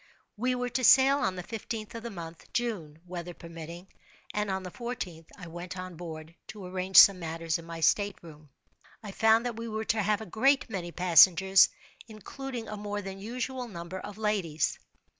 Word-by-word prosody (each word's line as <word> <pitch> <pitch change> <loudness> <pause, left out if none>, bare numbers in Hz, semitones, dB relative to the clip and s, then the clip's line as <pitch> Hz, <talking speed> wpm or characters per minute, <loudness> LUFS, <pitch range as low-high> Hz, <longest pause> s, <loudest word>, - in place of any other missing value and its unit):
We 250 +4 0
were 250 0 -2
to 255 +1 -2
sail 270 +3 +6
on 215 -9 0
the 180 - -6
fifteenth 220 +2 -6
of 230 - -6
the 235 - -6
month 170 -4 -10
(June), 200 -11 -3
weather 175 -1 -7
permitting; 170 +2 -9 0.5
and 210 -1 -1
on 190 0 -2
the 180 - -7
fourteenth, 195 -10 -6
I 185 - -9
went 175 +2 -7
on 185 -1 -7
board 160 -1 -8
to 210 -3 -9
arrange 185 0 -1
some 195 -2 +9
matters 165 -1 -3
in 165 - -11
my 165 0 -7
state 205 +5 +2
room. 155 -3 -14 0.5
I 205 - -6
found 225 +3 +3
that 240 -2 -3
we 230 0 -5
were 220 0 -3
to 215 0 +1
have 210 +1 +1
a - - -6
great 265 +8 +2
many 175 -4 -4
passengers, 185 +2 +6 0.4
including 235 +2 -7
a 210 - -6
more 205 0 -4
than 195 0 -7
usual 250 +4 -4
number 175 -2 -7
of 205 +2 -9
ladies. 195 -8 -1
195 Hz, 190 wpm, -29 LUFS, 170-225 Hz, 0.5 s, some